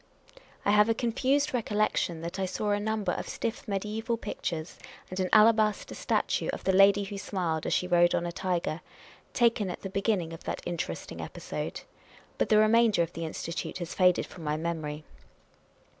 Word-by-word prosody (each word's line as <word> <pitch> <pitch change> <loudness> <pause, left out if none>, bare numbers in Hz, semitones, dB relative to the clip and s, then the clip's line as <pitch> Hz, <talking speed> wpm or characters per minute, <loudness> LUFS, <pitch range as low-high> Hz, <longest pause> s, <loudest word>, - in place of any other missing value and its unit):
I 205 - +4
have 210 +1 +5
a 225 - +3
confused 260 +5 +1
recollection 210 -7 0
that 170 +3 -5
I 190 - 0
saw 205 +3 -2
a 205 - +2
number 215 -3 -1
of - - -4
stiff 230 - -4
mediaeval 215 +3 -2
pictures, 170 -6 -5 0.3
and 185 - -4
an 185 -1 0
alabaster 215 -1 +4
statue - - 0
of - - -6
the 190 - +2
lady 200 +1 +6
who 200 0 -6
smiled 175 -6 -2
as - - +1
she - - +1
rode 175 -1 +4
on 170 - 0
a 170 - -2
tiger, 170 -2 -2 0.5
taken 230 -5 +2
at 180 - -6
the 195 - -5
beginning 195 -4 0
of 165 - -10
that - - -4
interest 175 -1 -4
ing - - -6
episode. - - -5 0.6
But - - +1
the 215 - +5
remainder 215 -3 +5
of 170 - -6
the 165 - -4
Institute 165 +3 -4
has 175 -2 -5
faded 180 -1 +3
from 170 - -11
my 150 0 -1
memory. 155 -2 -3
195 Hz, 185 wpm, -29 LUFS, 170-215 Hz, 0.6 s, lady